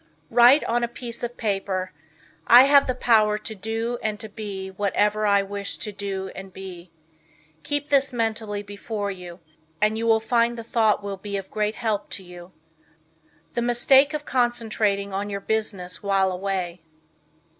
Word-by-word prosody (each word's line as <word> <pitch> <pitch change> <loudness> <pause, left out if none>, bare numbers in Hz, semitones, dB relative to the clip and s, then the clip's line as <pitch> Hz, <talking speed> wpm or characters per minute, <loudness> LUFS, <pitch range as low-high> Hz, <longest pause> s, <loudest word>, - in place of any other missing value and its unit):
Write 245 +5 +7
on 240 +1 0
a - - +1
piece 235 0 -7
of 240 0 -5
paper, 195 -3 -2 0.6
"I 245 +2 +9
have 280 0 +5
the 255 - 0
power 215 -4 +3
to 220 - -7
do 225 +4 -3
and 215 -1 -2
to 220 - -7
be 200 -3 -6
whatever 210 +2 +1
I 200 -1 +4
wish 200 0 -5
to 210 - -3
do 195 -1 -5
and 195 0 -9
be." 185 -2 -10 0.7
Keep 290 - -2
this 275 -1 +3
mentally 220 -3 -2
before 205 0 -4
you, 180 -2 -10 0.4
and 215 +1 +2
you 230 - -1
will 225 -1 +5
find 235 +1 +1
the 230 - -6
thought 220 -2 +2
will 200 -1 -4
be 200 +1 -4
of 195 -1 -7
great 215 0 -1
help 220 -4 -2
to 195 - -13
you. 175 0 -12 1.0
The 240 - -1
Mistake 265 +5 +4
of 300 0 -5
Concentrating 220 -5 0
on 200 +2 -2
Your 200 -1 -3
Business 200 -4 -3
While 195 -1 +2
Away. 185 -2 -3
210 Hz, 165 wpm, -24 LUFS, 195-235 Hz, 1.0 s, I